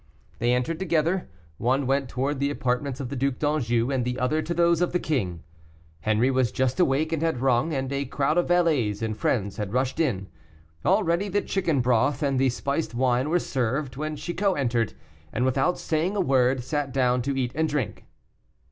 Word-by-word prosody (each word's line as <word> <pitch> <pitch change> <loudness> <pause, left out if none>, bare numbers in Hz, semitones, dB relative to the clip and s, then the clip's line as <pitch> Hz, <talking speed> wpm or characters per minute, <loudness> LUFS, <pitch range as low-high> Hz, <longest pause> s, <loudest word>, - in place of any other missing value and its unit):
They 120 +1 +2
entered 125 +7 -1
together; 170 0 0 0.3
one 130 +3 +1
went 135 0 0
towards 135 +3 -1
the 140 0 +1
apartments 130 -1 -2
of 130 -3 -4
the 140 - -4
Duc 135 0 0
d'Anjou, 125 -5 0
and 130 -2 0
the 125 +1 -2
other 140 +4 +1
to 165 - -6
those 170 0 +3
of 175 - +1
the 180 - +2
king. 95 - -2 0.6
Henri 110 +5 +2
was 130 -4 +1
just 130 +2 0
awake, 155 0 +2
and 160 - -1
had 165 -6 0
rung, 130 +4 +2
and 135 -2 -2
a 140 0 -1
crowd 145 +5 +1
of 175 - 0
valets 150 - +2
and 110 -1 -1
friends 100 -3 -1
had 105 -1 -4
rushed 130 +1 0
in; 105 - 0 0.6
already 170 +5 +2
the 205 +2 0
chicken 165 -8 0
broth 125 +5 +2
and 140 -2 +1
the 135 0 +3
spiced 140 0 -2
wine 125 +2 +1
were 175 - +3
served, 130 -2 -2
when 155 +2 -3
Chicot 185 +4 -1
entered, 120 -5 0 0.4
and 125 +3 0
without 135 +6 +1
saying 165 +5 -1
a - - 0
word, 130 -6 +2
sat 145 +1 -2
down 125 -1 +2
to 135 +2 -2
eat 125 -2 -1
and 160 +1 0
drink. 145 -7 -3
135 Hz, 195 wpm, -25 LUFS, 125-155 Hz, 0.6 s, those